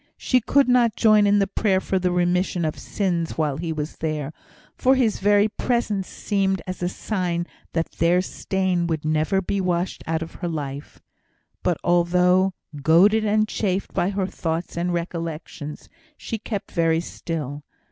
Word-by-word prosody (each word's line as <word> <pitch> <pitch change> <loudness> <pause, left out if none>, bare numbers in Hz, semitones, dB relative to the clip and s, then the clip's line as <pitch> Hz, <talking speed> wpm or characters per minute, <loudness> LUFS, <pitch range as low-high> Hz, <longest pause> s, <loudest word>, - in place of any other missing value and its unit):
She 255 -1 +2
could 280 +4 +3
not 245 -3 +4
join 215 -2 +5
in 205 0 +4
the 200 - +3
prayer 195 -1 +1
for 190 0 -1
the 180 0 +1
remission 175 0 +1
of 155 - -3
sins 175 -5 -2
while 150 -4 0
he 165 +1 -3
was 155 0 -4
there, 155 -2 -3 0.4
for 260 +1 +3
his 240 -5 +1
very 205 +1 +4
presence 215 -4 -1
seemed 195 -2 0
as 185 -1 -6
a 175 - 0
sign 180 -4 -2 0.3
that 165 0 -1
their 170 +2 +2
stain 185 -1 -1
would 160 -2 -2
never 155 +5 +1
be 195 +2 -1
washed 180 0 -1
out 160 0 0
of 165 - -10
her 175 - -1
life. 145 -3 -6 0.6
But, 175 -3 +1
although 180 +2 +3 0.3
goaded 190 +9 +5
and 215 +1 +2
chafed 195 -3 -2
by 180 - +1
her 195 -1 -1
thoughts 165 -2 -3
and 175 +1 -1
recollections, 165 -3 -5 0.3
she 225 - -5
kept 205 -2 -5
very 165 -1 +2
still. 150 -4 -5
180 Hz, 165 wpm, -23 LUFS, 165-200 Hz, 0.6 s, join